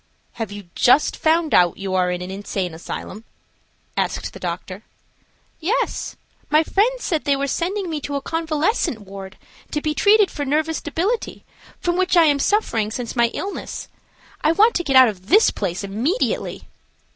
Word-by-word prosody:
"Have 225 -3 -5
you 205 -2 -9
just 270 +4 +4
found 320 0 +1
out 175 -2 +4
you 195 -1 -4
are 180 -1 +2
in 180 0 -3
an 180 - -6
insane 190 -3 -3
asylum?" 185 +5 -7 0.7
asked - - -2
the - - -10
doctor. - - -5 0.8
"Yes; 395 +10 -1 0.3
my 305 +2 +4
friends 475 +9 +1
said 320 -5 -1
they 280 - +2
were 275 0 -1
sending 365 +7 -2
me 310 -3 -3
to 285 +1 -4
a 280 - -1
convalescent 325 - -1
ward 195 -1 -10 0.3
to 300 - -1
be 305 0 -1
treated 410 +4 +4
for 290 - -4
nervous 310 +3 0
debility, 370 +10 -2 0.3
from 350 0 0
which 370 -1 +2
I 335 - +7
am 290 -2 +3
suffering 255 - +1
since 235 +2 -5
my 235 -1 +4
illness. 395 +1 -5 0.5
I 315 - +4
want 435 +6 +5
to 350 - -2
get 275 -5 0
out 260 -1 +9
of 190 -4 -6
this 425 +5 +5
place 190 0 -3
immediately." 235 - -1
295 Hz, 170 wpm, -21 LUFS, -, 0.8 s, out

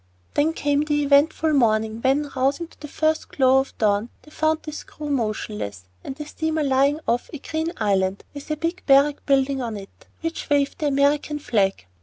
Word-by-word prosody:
Then 310 +3 +2
came 290 -2 +1
the 295 -1 0
eventful 295 +2 +3
morning, 220 -3 +2
when, 275 +3 +1
rousing 275 +6 0
to - - -22
the 300 - -8
first 310 +2 0
glow 265 -1 +4
of 265 - -4
dawn, 210 +1 +1
they 300 - -17
found 315 +1 0
the 305 - -6
screw 300 0 -7
motionless, 215 - -3 0.2
and 265 - -6
the 300 +1 -7
steamer 315 +1 -2
lying 275 +2 +2
off 240 +1 0
a - - -4
green 320 +3 -3
island, 195 -2 0
with 285 +1 -9
a 305 - -1
big 335 +3 -2
barrack 280 +1 +4
building 275 -1 +2
on 230 -3 -4
it, 195 -1 -9
over - - -21
which 330 0 -4
waved 285 -1 +1
the 300 - 0
American 285 +1 +1
flag. 200 - 0
280 Hz, 195 wpm, -23 LUFS, 235-300 Hz, 0.2 s, glow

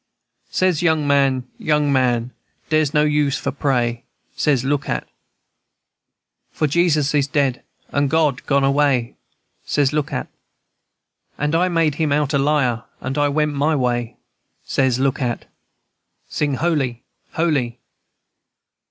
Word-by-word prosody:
Says, 185 -4 +1
young 160 -3 +2
man, 135 -3 +2
young 150 -2 +1
man, 125 -2 +1 0.4
dere's 155 -2 +2
no 150 -1 +3
use 150 -2 +1
for - - -3
pray, 120 -4 -1 0.3
Says, 140 -5 +1
look 145 0 -1
at, - - -1
&c. - - -36 1.4
For 155 - -1
Jesus 150 -2 +2
is 145 -2 +2
dead, 140 -3 0 0.3
and 140 -1 0
God 150 -2 +1
gone 140 -1 +2
away, 135 -3 +2 0.5
Says, 145 -1 +1
look 150 -2 -1
at, 65 - -2
&c. - - -35 1.1
And 150 +1 -1
I 180 +3 +2
made 165 -3 +2
him 155 -2 +1
out 145 -1 +1
a 140 - +3
liar, 135 -5 +1 0.2
and 130 +1 -4
I 145 -1 +2
went 150 +1 0
my 145 +3 +1
way, 120 -3 -1 0.5
Says, 130 -2 +1
look 135 +2 0
at, 120 -2 -1
&c. - - -37 0.9
Sing 145 -2 +1
holy, 135 -7 -1 0.3
holy! 140 -8 0
145 Hz, 145 wpm, -20 LUFS, 130-150 Hz, 1.4 s, no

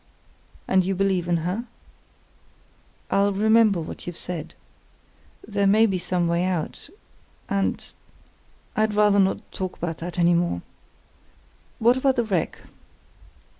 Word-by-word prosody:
"And 190 -1 +3
you 190 +1 -1
believe 190 -2 0
in 175 -1 +2
her?" 200 +7 -2 1.5
"I'll 200 +1 +3
remember 215 -1 +4
what 160 - -8
you've 175 -1 -6
said. 170 -3 -6 0.9
There 200 -2 +1
may 215 +3 +5
be 190 -4 0
some 175 0 0
way 170 +1 +1
out. 180 -4 -3 0.6
And—I'd 210 +2 -4
rather 210 -1 +4
not 195 0 0
talk 185 -1 -5
about 165 -2 -4
that 175 +2 -6
any 175 0 +4
more. 170 - 0 1.1
What 240 +3 +4
about 265 0 +2
the 240 - +1
wreck?" 190 -7 -1
190 Hz, 125 wpm, -24 LUFS, 175-210 Hz, 1.5 s, may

